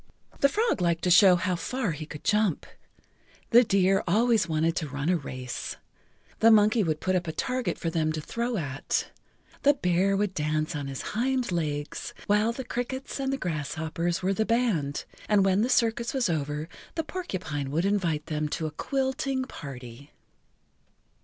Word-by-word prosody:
The 280 - +5
frog 440 - +1
liked 170 -1 +1
to 180 - +2
show 185 +1 +8
how 180 +1 0
far 225 +4 -2
he 155 0 -6
could 150 -2 -9
jump, 210 -6 +1 0.9
the 240 +1 +8
deer 195 -2 +3
always 220 +1 +3
wanted 160 +1 +1
to 155 -4 -2
run 145 +3 -2
a 180 - +4
race, 130 -5 -5 0.6
the 225 - +6
monkey 215 +1 +5
would 155 -3 -1
put 185 0 0
up 180 -1 -1
a - - -1
target 250 +8 -2
for 165 - -2
them 155 -1 +1
to 155 - -3
throw 235 +8 -2
at, 140 -5 -2 0.5
the 285 0 +5
bear 190 -2 +2
would 205 -1 0
dance 155 +1 -1
on 145 -2 -3
his 135 -1 -5
hind 250 +1 0
legs, 150 -4 -3
while 210 +2 +3
the 260 +3 -5
crickets 260 +3 -4
and 270 0 -1
the 270 - -1
grasshoppers 165 - -2
were 190 +1 +2
the 220 - +1
band, 215 - 0 0.2
and 205 -2 +4
when 195 +1 +3
the 240 - +1
circus 235 +1 +1
was 245 -9 +1
over 150 0 -2 0.3
the 325 - -1
porcupine 185 - -4
would 160 +6 0
invite 175 -7 0
them 150 -1 -2
to 160 - -2
a 155 - -3
quill 265 - -1
ting 265 -1 -1
party. 135 - -9
180 Hz, 180 wpm, -27 LUFS, 155-230 Hz, 0.9 s, show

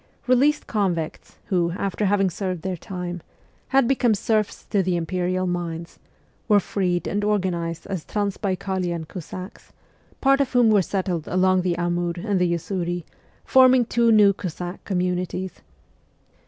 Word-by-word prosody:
Released 275 +4 +3
convicts 180 -7 -2
who, 170 -3 0
after 200 +2 -1
having 195 -1 +2
served 185 -2 -4
their 190 -1 -2
time, 180 -1 -6 0.5
had 270 -2 +3
become 245 -4 +3
serfs 215 0 -1
to 200 - +3
the 185 -1 0
Imperial 180 +2 -1
mines, 170 -2 -4 0.5
were 210 -2 +5
freed 180 -2 -1
and 205 +1 -1
organized 180 -5 -1
as 185 -5 -4
Transbaikalian 190 -4 -2
Cossacks, 185 +2 -9 0.5
part 275 0 +4
of 270 -2 -1
whom 240 -3 +5
were 205 -2 +5
settled 185 -3 -2
along 185 +1 +3
the 180 -1 -1
Amur 175 0 0
and 195 +1 -1
the 180 -1 +2
Usuri, 175 0 -2 0.4
forming 255 -2 +6
two 235 0 +2
new 205 -2 +6
Cossack 180 0 -6
communities. 180 -1 -2
185 Hz, 140 wpm, -23 LUFS, 175-210 Hz, 0.5 s, forming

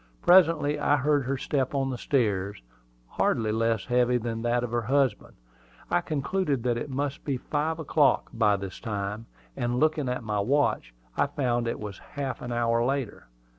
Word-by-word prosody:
Presently 165 -5 +5
I 145 0 +3
heard 145 0 +1
her 135 +1 -1
step 135 0 -1
on 135 -1 0
the 125 - -4
stairs, 100 - 0 0.4
hardly 110 - 0
less 115 -2 0
heavy 125 0 +2
than 115 -1 -3
that 120 +1 +1
of 120 - -4
her 120 0 0
husband. 130 -1 0 0.6
I 85 - +3
concluded 150 -2 -1
that 120 -1 +1
it 120 +5 -4
must 140 +2 -3
be 140 -3 -1
five 155 +5 -2
o'clock 150 -2 +2
by 105 -3 +3
this 95 -1 -6
time; 105 0 -4 0.3
and 120 +1 -1
looking 155 -3 +1
at 125 -1 -3
my 105 -2 -1
watch, 125 - +1 0.2
I - - +2
found 125 -5 -1
it 115 - -2
was 105 -2 -7
half 140 -2 -5
an 120 - -5
hour 115 0 +1
later. 135 -3 -2
125 Hz, 175 wpm, -27 LUFS, 115-145 Hz, 0.6 s, Presently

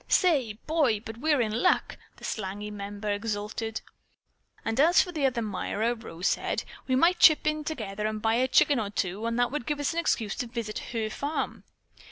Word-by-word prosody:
"Say, 285 - +3
Boy, 300 -9 +2
but 225 +1 -9
we're 295 +1 +2
in 220 +1 -1
luck!" 360 - +2 0.2
the - - -18
slangy 205 0 -4
member 205 +1 -4
exulted. 215 +1 -3 0.8
"And 225 +3 -1
as 335 +5 +6
for 360 - -7
the 300 -5 +1
other 240 -3 -1
Myra," 215 +3 -1
Rose 185 -7 -8
said, - - 0 0.2
"we 260 - +2
might 340 +7 +4
chip 310 - +7
together 270 -10 -2
and 215 0 -3
buy 225 +1 +1
a 250 +3 +2
chicken 275 +1 +4
or 210 -2 -2
two, 200 0 -2
and 230 0 -1
that 245 0 +2
would 295 -4 -4
give 295 -1 -1
us 290 +3 0
an 335 - -1
excuse 225 -10 0
to 245 - -2
visit 230 -3 -4
her 225 -2 -1
farm." 290 +6 -3
230 Hz, 195 wpm, -28 LUFS, 210-290 Hz, 0.8 s, chip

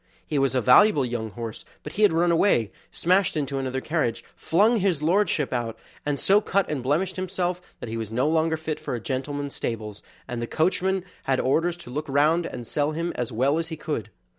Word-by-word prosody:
He 150 - -1
was 135 -1 +1
a 130 - +3
valuable 145 - +6
young 115 -2 -3
horse, 115 +1 -6 0.2
but 150 - -7
he 210 - -3
had 210 - +6
run 170 +1 +2
away, 165 - +3 0.2
smashed 185 -1 +2
into 140 -2 -1
another 130 0 -2
carriage, 155 -8 -1
flung 215 +7 +3
his 180 -6 +1
lordship 165 -5 +2
out, 120 -2 -2 0.3
and 145 -1 +1
so 200 +2 +4
cut 200 -2 +1
and 145 -4 -2
blemished 165 +9 0
himself 180 -1 -2 0.2
that - - -5
he 115 +1 -4
was 110 -2 -4
no 125 +5 +1
longer 160 0 +2
fit 160 -1 -4
for - - -4
a - - -3
gentleman's 140 +3 -3
stables, 105 -3 -4 0.3
and 120 -1 -4
the 120 - -3
coachman 185 +4 +1 0.2
had 135 -1 +1
orders 165 +6 +1
to 145 -8 -10
look 150 +3 -4
round, 155 +5 +3
and 120 - -7
sell 145 +5 -1
him 170 +2 -2
as 125 0 -3
well 135 +7 +2
as 165 - -3
he 160 -1 -6
could. 150 -9 -4
150 Hz, 215 wpm, -25 LUFS, 125-175 Hz, 0.3 s, valuable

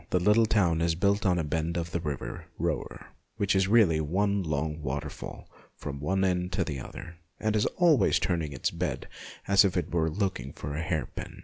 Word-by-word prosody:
The 90 - +2
little 105 +5 +4
town 85 -7 +2
is 85 -1 +2
built 100 +3 +2
on 90 -1 +3
a 85 - 0
bend 80 +3 -1
of 85 0 -3
the 85 - -1
river 75 -4 -5
Roer, - - -3 0.3
which 100 -1 +1
is 95 0 +3
really 95 -8 +4
one 100 +6 +1
long 80 -1 -2
waterfall 70 -1 -5 0.3
from 70 -1 -6
one 95 +7 0
end 90 -1 0
to 95 - +1
the 75 -5 -4
other, 85 +6 -9 0.2
and 110 0 0
is 105 - +2
always 160 - +4
turning 85 -5 -1
in - - -7
its - - -1
bed - - -3 0.4
as 100 0 +6
if 95 -2 +1
it 85 -1 -2
were 80 -2 +2
looking 85 - -2
for 75 - -6
a 80 - -2
hairpin. 80 -1 -4
85 Hz, 205 wpm, -28 LUFS, 80-100 Hz, 0.4 s, as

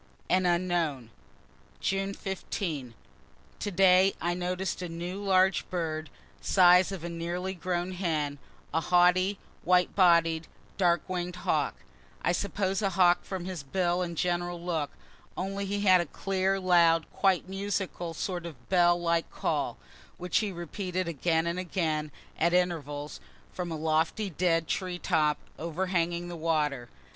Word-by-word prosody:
AN 185 0 +3
UNKNOWN 170 -9 0 0.7
June 195 0 -1
15. 160 - -4 0.6
To - - -2
day 190 +1 +5
I 175 +2 0
noticed 180 +1 -2
a 180 - -4
new 175 +3 -5
large 190 -1 +3
bird, 160 -3 -3 0.3
size 180 0 +5
of 190 -4 -6
a - - -3
nearly 175 +2 -3
grown 180 0 -2
hen 155 -6 -2 0.3
a 160 - +2
haughty, 180 +3 +3 0.3
white 180 +1 +3
bodied 170 -3 +4 0.3
dark 175 -2 +2
wing'd 180 -1 -3
hawk - - +1 0.5
I - - +2
suppose 195 +1 -1
a 200 - +1
hawk 180 -1 +4
from 185 -2 -5
his 185 -4 -5
bill 175 +5 0
and 170 -2 -3
general 175 0 -1
look 165 -4 -2 0.5
only 195 +2 -3
he 200 +1 -2
had 185 -3 +6
a 170 - -4
clear, 195 +3 0
loud, 170 -3 +4
quite 190 -3 +2
musical, 190 -3 -3
sort 175 0 -3
of 145 -7 -13
bell 175 -2 +4
like 170 -1 0
call, - - -2 0.4
which 180 0 0
he 210 -3 -2
repeated 180 +1 -4
again 160 +1 0
and 170 +1 -1
again, 160 -4 -1 0.3
at 170 +2 +2
intervals, 150 -5 -1 0.3
from 175 -2 -4
a 160 - -3
lofty 160 +6 0
dead 165 0 +1
tree 185 -2 -2
top, 155 -4 +1 0.2
overhanging 170 +1 -1
the 175 - -6
water. 150 -6 -1
175 Hz, 145 wpm, -29 LUFS, 165-185 Hz, 0.7 s, had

